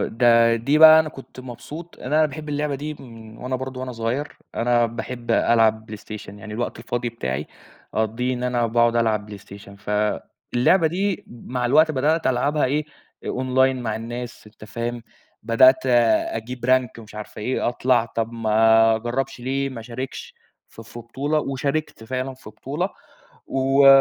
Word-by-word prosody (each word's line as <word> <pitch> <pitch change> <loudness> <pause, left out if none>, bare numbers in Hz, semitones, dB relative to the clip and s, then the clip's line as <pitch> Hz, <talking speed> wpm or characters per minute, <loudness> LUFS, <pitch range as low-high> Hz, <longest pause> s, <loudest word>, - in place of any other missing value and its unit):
ده 115 0 +4
دي 140 +7 +1
بقى 160 0 +10
أنا 160 - -2
كنت 135 -3 -12
مبسوط، 130 +7 -9
أنا 155 +4 +2
باحب 150 +1 -8
اللعبة 145 0 -1
دي 150 +3 -5
من 115 -5 -13
وأنا 130 +1 -3
برضو 130 0 -6
وأنا 130 -1 -5
صغير، 115 +6 -3 0.2
أنا 120 0 +2
باحب 120 +1 -6
ألعب 110 -2 +3
PlayStation، 105 0 -8
يعني 105 +2 -9
الوقت 120 0 -3
الفاضي 120 +1 -3
بتاعي 75 - -4 0.5
اقضّيه 115 +4 0
إن 125 - -5
أنا 125 -1 +1
باقعد 120 +1 +2
ألعب 110 -3 0
PlayStation، 100 0 -13
فاللعبة 105 - 0
دي 190 +3 -1
مع 125 +1 -4
الوقت 155 +5 +5
بدأت 155 +3 +1
ألعبها 145 +4 +1
إيه، 145 +4 0 0.4
online 130 +1 +1
مع 110 -3 -2
الناس، 120 +1 -7
أنتَ 105 0 -14
فاهم؟ 115 +2 -4 0.4
بدأت 130 +3 +5
أجيب 120 0 +1
rank 130 -2 +2
مش 110 -1 -14
عارف 105 0 -8
إيه، 120 +4 -1
أطلع، 120 -1 +2
طب 115 0 -3
ما 115 0 +4
اجربش 120 +3 -3
ليه، 135 +2 -1
ما 130 -4 -7
اشاركش 125 +3 -7 0.3
في 115 - -12
في 115 +1 -11
بطولة؟ 135 +6 -2
وشاركت 140 -2 -3
فعلًا 130 +2 -3
في 130 -4 -13
بطولة، 145 - -3 0.6
و 135 +1 +3
120 Hz, 155 wpm, -23 LUFS, 115-135 Hz, 0.6 s, بقى